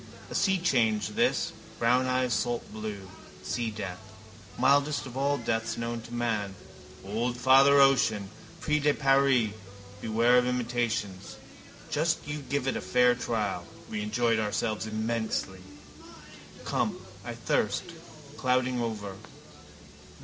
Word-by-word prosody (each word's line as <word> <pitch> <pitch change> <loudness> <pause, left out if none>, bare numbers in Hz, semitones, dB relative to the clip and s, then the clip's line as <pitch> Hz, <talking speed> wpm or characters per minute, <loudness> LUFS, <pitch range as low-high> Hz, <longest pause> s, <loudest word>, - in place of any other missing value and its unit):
A - - -5
seachange 135 - +2
this, - - +1 0.2
brown 125 +2 +3
eyes 130 -1 +1
saltblue. 110 -5 -3 0.4
Seadeath, 105 -6 -3 0.6
mildest 140 +3 +3
of 130 -2 -9
all 140 +1 +1
deaths 115 -2 -2
known 115 0 -3
to 115 - -12
man. 110 -5 -2 0.5
Old 115 +5 -2
Father 135 +3 +6
Ocean. 110 -8 +3 0.3
Prix 150 0 +1
de 145 0 +2
Paris: 135 -5 +3 0.5
beware 115 +3 +4
of 125 - 0
imitations. 115 -5 -2 0.6
Just 160 +1 0
you 145 +1 -3
give 140 0 -2
it 135 - 0
a - - -3
fair 125 0 +4
trial. 110 -7 -2 0.3
We 215 -1 -2
enjoyed 120 - +1
ourselves 110 0 -1
immensely. 110 -3 -2 1.0
Come. - - -1 0.3
I - - -6
thirst. - - 0 0.5
Clouding 125 -1 +1
over. 105 -4 -4
120 Hz, 115 wpm, -28 LUFS, 110-135 Hz, 1.0 s, Father